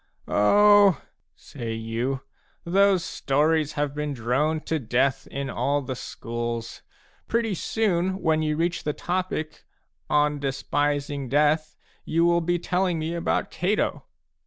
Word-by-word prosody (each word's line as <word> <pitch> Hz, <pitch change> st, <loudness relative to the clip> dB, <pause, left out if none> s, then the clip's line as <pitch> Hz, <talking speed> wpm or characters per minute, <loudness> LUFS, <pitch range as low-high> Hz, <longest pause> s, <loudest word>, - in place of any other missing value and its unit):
"Oh," 205 Hz, -, +5 dB, 0.4 s
say 115 Hz, -5 st, -7 dB
you, 115 Hz, +4 st, -2 dB, 0.4 s
"those 190 Hz, 0 st, +3 dB
stories 150 Hz, -1 st, +1 dB
have 145 Hz, -2 st, -1 dB
been 150 Hz, -1 st, -3 dB
droned 140 Hz, +7 st, 0 dB
to 160 Hz, -, -1 dB
death 125 Hz, +2 st, 0 dB
in 140 Hz, 0 st, -4 dB
all 140 Hz, +2 st, 0 dB
the 130 Hz, 0 st, -4 dB
schools; 115 Hz, -1 st, -5 dB, 0.5 s
pretty 230 Hz, -2 st, 0 dB
soon, 190 Hz, -1 st, 0 dB
when 160 Hz, -3 st, +1 dB
you 155 Hz, -1 st, 0 dB
reach 170 Hz, +2 st, -1 dB
the 150 Hz, -, -1 dB
topic 175 Hz, -3 st, -3 dB, 0.2 s
* -, -, -49 dB, 0.2 s
On 150 Hz, 0 st, +2 dB
Despising 140 Hz, 0 st, -1 dB
Death/ 150 Hz, +3 st, +2 dB, 0.3 s
you 165 Hz, +1 st, +1 dB
will 170 Hz, 0 st, +3 dB
be 175 Hz, +1 st, 0 dB
telling 180 Hz, 0 st, 0 dB
me 160 Hz, +1 st, -3 dB
about 170 Hz, -, -1 dB
Cato." 195 Hz, +5 st, -1 dB
150 Hz, 135 wpm, -25 LUFS, 135-175 Hz, 0.5 s, Oh